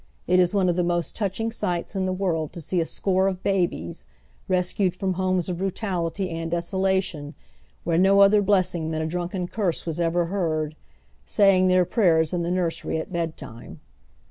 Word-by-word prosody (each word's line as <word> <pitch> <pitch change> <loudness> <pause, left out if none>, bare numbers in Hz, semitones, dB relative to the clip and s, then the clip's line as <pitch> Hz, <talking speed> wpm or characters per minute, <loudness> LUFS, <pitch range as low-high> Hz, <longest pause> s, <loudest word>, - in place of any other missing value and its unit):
It 180 +1 +3
is 180 -1 +3
one 195 -3 +2
of 175 - +2
the 180 - +1
most 175 -1 -1
touching 220 +2 -2
eights 175 +2 -2
in 190 -1 0
the - - 0
world 175 -5 -1
to - - -7
see 170 +3 -1
a 165 - -2
score 190 0 +1
of 190 -1 -3
babies, 170 - -1 0.4
rescued 180 0 +1
froTii 190 0 -2
homes 185 -1 0
of 175 -2 -3
brutality 190 -1 -2
and 165 0 -4
desolation, 175 -3 -1 0.5
where 165 0 +1
no 195 +2 +5
otlier 200 +1 +6
blessing 185 -5 +1
than 160 0 -2
a - - -2
di'unken 175 +2 -3
curse 195 -7 -1
was 165 0 -3
ever 170 +1 +1
heard, 160 -4 -2 0.5
saying 190 - +4
tlieir 185 -1 +4
prayei 170 -6 +3
s 160 - -7
in 175 - 0
the 170 - -2
nursery 175 -3 -1
at 160 - -6
bedtime. 160 -9 -6
180 Hz, 185 wpm, -24 LUFS, 165-190 Hz, 0.5 s, otlier